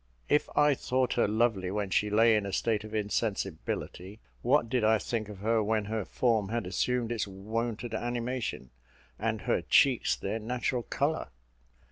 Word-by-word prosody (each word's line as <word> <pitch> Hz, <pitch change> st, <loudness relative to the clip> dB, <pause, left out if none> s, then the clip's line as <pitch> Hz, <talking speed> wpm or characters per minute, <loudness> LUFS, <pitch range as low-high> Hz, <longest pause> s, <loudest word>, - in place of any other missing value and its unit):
If 150 Hz, -, +2 dB
I 150 Hz, 0 st, +5 dB
thought 130 Hz, -1 st, 0 dB
her 120 Hz, -, +2 dB
lovely 105 Hz, -3 st, +1 dB
when 100 Hz, 0 st, -2 dB
she 105 Hz, +4 st, +2 dB
lay 110 Hz, +2 st, +5 dB
in 105 Hz, -2 st, 0 dB
a -, -, -4 dB
state 110 Hz, +1 st, 0 dB
of 110 Hz, 0 st, -7 dB
insensibility, 100 Hz, -2 st, -3 dB, 0.2 s
what 125 Hz, 0 st, +3 dB
did 120 Hz, 0 st, 0 dB
I 110 Hz, +1 st, +5 dB
think 110 Hz, 0 st, -3 dB
of 105 Hz, -, -8 dB
her 110 Hz, +1 st, +2 dB
when 105 Hz, 0 st, 0 dB
her 110 Hz, -1 st, -2 dB
form 110 Hz, -5 st, +1 dB
had 115 Hz, -2 st, -2 dB
assumed 120 Hz, +5 st, -1 dB
its 115 Hz, -3 st, -1 dB
wonted 110 Hz, +4 st, -4 dB
animation, 120 Hz, -, -3 dB, 0.5 s
and -, -, -1 dB
her -, -, +1 dB
cheeks 130 Hz, -4 st, +4 dB
their 105 Hz, +3 st, -3 dB
natural 125 Hz, +2 st, -1 dB
colour? 115 Hz, -, -1 dB
110 Hz, 165 wpm, -29 LUFS, 105-120 Hz, 0.5 s, I